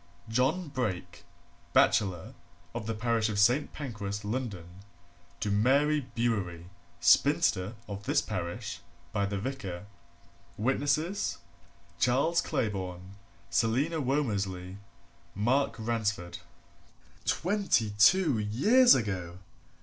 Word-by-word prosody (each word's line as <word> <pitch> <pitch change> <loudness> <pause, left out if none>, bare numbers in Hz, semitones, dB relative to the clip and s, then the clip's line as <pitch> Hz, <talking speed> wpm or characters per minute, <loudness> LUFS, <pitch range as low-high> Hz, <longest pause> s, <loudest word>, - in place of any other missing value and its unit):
John 135 +9 0
Brake, 115 -10 -4 0.5
bachelor, 95 -5 +2 0.4
of 115 -2 -5
the 115 - -2
parish 115 -1 0
of 105 - -3
St. 120 +8 +3
Pancras, 105 -7 -5
London, 100 -7 -5 0.6
to 105 - -1
Mary 140 +6 +2
Bewery, 100 -8 -1 0.3
spinster, 95 +5 +3
of 100 -1 -7
this - - +2
parish, 85 0 -4 0.3
by 100 -1 0
the 100 0 -3
Vicar. 100 -6 -5 0.7
Witnesses, 145 - 0 0.6
Charles 140 +7 +2
Claybourne, 95 -3 -3 0.4
Selina 130 - +1
Womersley, 100 -9 -2 0.6
Mark 120 +4 +1
Ransford. 110 -6 -2 0.8
Twenty 180 - +1
two 160 - +5
years 210 - +5
ago! 95 -7 -3
110 Hz, 95 wpm, -29 LUFS, 100-135 Hz, 0.8 s, two